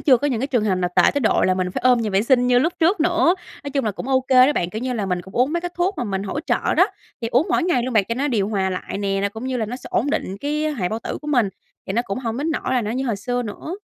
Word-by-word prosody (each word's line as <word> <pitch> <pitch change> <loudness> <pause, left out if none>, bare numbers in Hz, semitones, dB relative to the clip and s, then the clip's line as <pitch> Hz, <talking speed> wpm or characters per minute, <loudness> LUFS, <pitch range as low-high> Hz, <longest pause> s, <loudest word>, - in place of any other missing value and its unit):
chưa 260 -4 +5
có 290 - -1
những 240 -4 -1
cái 270 - 0
trường 245 -6 0
hợp 195 -3 +2
nào 180 -1 -1
tệ - - +7
tới 285 - +1
độ, 220 - +2
là 185 - +3
mình 185 -1 -1
phải - - -4
ôm 250 -1 +5
nhà 220 -2 -1
vệ 195 +2 +2
sinh 250 0 +3
như 245 0 +4
lúc 325 +7 +1
trước 345 +3 +3
nữa. 345 +2 +3 0.3
Nói 285 - -4
chung 275 -3 -1
là 215 - +1
cũng 245 - -7
ô 260 -1 +3
kê 255 0 +5
đó 295 - +2
bạn, 175 -7 -1
kiểu 220 +3 -5
như 255 -1 -1
là, 210 -5 -2
mình 180 -1 -1
cũng 190 - -14
uống 255 +5 +2
mấy 340 - 0
cái 355 0 -4
thuốc 365 +3 +1
mà 245 - -1
mình 195 -2 -2
hỗ 245 +9 -3
trợ - - 0
đó, - - +5 0.4
thì 230 - -1
uống 250 +7 +2
mỗi - - +2
ngày 335 -9 +1
luôn 255 0 -3
bạn 210 -3 +4
cho 230 - -1
nó 280 +4 -1
điều 210 -5 0
hòa 190 -3 0
lại 185 +1 -4
nè, 195 -1 -1
là 200 - +1
cũng 220 +4 -8
như 260 -1 -1
là 220 -3 -1
nó 245 +3 -5
sẽ 260 - -12
ổn 285 - +1
định 190 -7 -2
cái, 300 +2 -1
a, 305 - 0
hệ 180 -7 -1
bao 220 - -3
tử - - -5
của 300 - -6
mình, 245 -8 +3 0.4
thì 190 - -3
nó 235 +3 +1
cũng 195 +1 -4
hổng 230 -2 -3
đến 300 +4 -1
nỗi 305 - -1
là 245 - +2
nó 210 - -3
như 260 +2 -2
hồi 225 -4 0
xưa 245 +4 -2
nữa. 235 - -6
245 Hz, 355 wpm, -21 LUFS, 205-280 Hz, 0.4 s, tệ